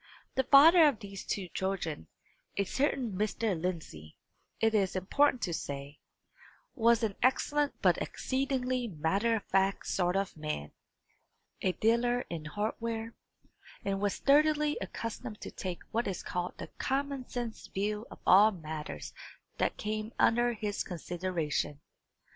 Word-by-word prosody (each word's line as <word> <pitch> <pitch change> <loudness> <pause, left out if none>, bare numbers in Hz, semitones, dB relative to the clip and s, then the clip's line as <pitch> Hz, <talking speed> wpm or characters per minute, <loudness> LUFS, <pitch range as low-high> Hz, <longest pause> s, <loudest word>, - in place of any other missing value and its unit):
The 265 - +1
father 315 +5 +8
of 285 - +1
these 200 -3 -8
two 195 -3 -3
children, 180 - -3 0.5
a 200 - +3
certain 260 +2 0
Mr. 210 +1 0
Lindsey, 160 - -5 0.4
it 225 0 +3
is 195 -4 +2
important 255 +8 +2
to 175 - -1
say, 140 -1 -5 0.7
was 235 -2 +3
an 210 -3 0
excellent 290 +3 +2
but - - +4
exceedingly 255 -2 -1
matter 195 +6 +1
of 215 - -3
fact 195 0 +1
sort 180 -1 +1
of 195 -1 -1
man, 150 - -4 0.9
a 185 - +1
dealer 240 +3 +2
in 160 -3 -4
hardware, 225 +5 -3 0.7
and 195 0 -1
was 205 -2 +1
sturdily 300 +1 +3
accustomed 230 -1 -5
to - - -6
take 180 -2 -5
what 230 +2 0
is 190 - -3
called 180 0 -3
the - - -8
common 275 -1 -1
sense 240 -3 -5
view 210 +3 -2
of - - -11
all 200 +4 +8
matters 160 -6 -6 0.5
that - - +1
came 215 +1 -3
under 240 +1 +3
his 210 -2 -2
consideration. 170 -4 -2
210 Hz, 135 wpm, -31 LUFS, 180-245 Hz, 0.9 s, father